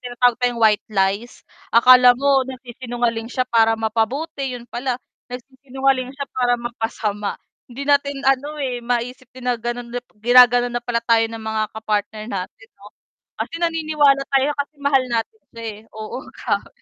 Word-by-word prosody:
tinatawag 245 -1 +1
tayong 245 -1 +1
white 215 -2 +3
lies. 200 +3 -1 0.2
Akala 250 +1 +7
mo 275 +1 +3
nagsisinungaling 240 -2 -4
siya 255 0 -1
para 225 -2 +3
mapabuti, 250 +5 -2
yun 240 - -11
pala, 245 +1 -3 0.3
nagsisinungaling 260 +1 -2
siya 275 +2 -6
para 245 -1 +1
mapasama. 225 -3 -3 0.3
Hindi 260 +3 -7
natin 280 -1 +1
ano, 270 +3 +1
eh, 260 -4 -3
maisip 245 +1 -3
din 255 0 -13
na 245 -2 0
ganon 240 0 -5
nap 245 - -2 0.2
ginaganon 245 +2 +5
na 240 - -1
pala 235 -1 -2
tayo 230 -1 +4
ng 230 - -7
mga 220 0 -1
ka-partner 215 0 -3
natin 195 +3 -6
'no. 200 - -17 0.5
Kasi - - -4
naniniwala 310 -4 +2
tayo 275 +1 +3
kasi 285 +1 -4
mahal 280 -2 +3
natin 235 - -2
sila 230 - -10
eh, 220 -2 -6
oo, 215 0 -7 0.2
grabe. - - -2
245 Hz, 155 wpm, -21 LUFS, 230-265 Hz, 0.5 s, Akala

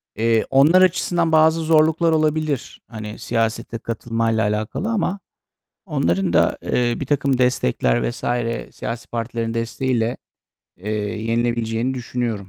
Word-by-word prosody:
Eee, 115 +1 +2
onlar 155 +7 +5
açısından 175 -2 +2
bazı 160 +1 +4
zorluklar 160 +1 +3
olabilir 155 -3 -1
hani, 110 -2 -8
siyasete 115 +1 -2
katılmayla 115 -1 -1
alakalı 105 - -2
ama 200 -3 -1 0.7
onların 90 +1 0
da, - - +3
eee, 120 -1 0
birtakım 140 -1 0
destekler 60 - +1
vs. - - -9 0.5
siyasi 115 -2 -5
partilerin 115 -1 -3
desteğiyle, 115 0 -1 0.6
eee, 100 +5 -6 0.3
yenilebileceğini 115 +1 0
düşünüyorum. 120 -2 -2
120 Hz, 110 wpm, -21 LUFS, 115-155 Hz, 0.7 s, onlar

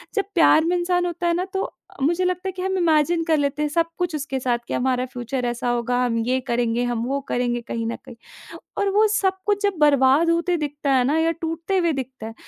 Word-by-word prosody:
जब 405 - +1
प्यार 315 -2 +5
में 350 +2 +1
इंसान 355 0 +1
होता 345 0 -2
है 340 - +2
ना, 355 +2 -1
तो 385 0 -4 0.3
मुझे 340 +6 +1
लगता 365 +1 -1
है - - -1
कि 370 0 -7
हम 380 +1 -1
इमेजिन 330 -1 +2
कर 320 -1 +2
लेते 285 0 -1
हैं 300 - 0
सब 335 +2 +1
कुछ 355 -3 -1
उसके 280 -2 -3
साथ, 245 -2 0
कि - - -4
हमारा 255 0 0
फ्यूचर 250 0 -4
ऐसा 240 0 -2
होगा, 240 +1 0
हम 230 -2 0
ये 255 +2 +1
करेंगे, 240 0 0
हम 240 -2 -1
वो 275 +2 -1
करेंगे 240 -1 -1
कहीं 230 0 -4
न 230 - -2
कहीं 245 - -11 0.6
और 400 - +1
वो 420 +2 +4
सब 405 -3 +1
कुछ 410 -1 +1
जब 405 -1 +2
बर्बाद 285 +2 +4
होते 340 +1 +1
दिखता 290 -2 -2
है 255 -1 +4
ना 290 +5 +1
या 325 +1 +2
टूटते 330 +4 -2
हुए 340 -2 +2
दिखता 260 -4 -6
है, 225 - -8
300 Hz, 240 wpm, -22 LUFS, 250-350 Hz, 0.6 s, प्यार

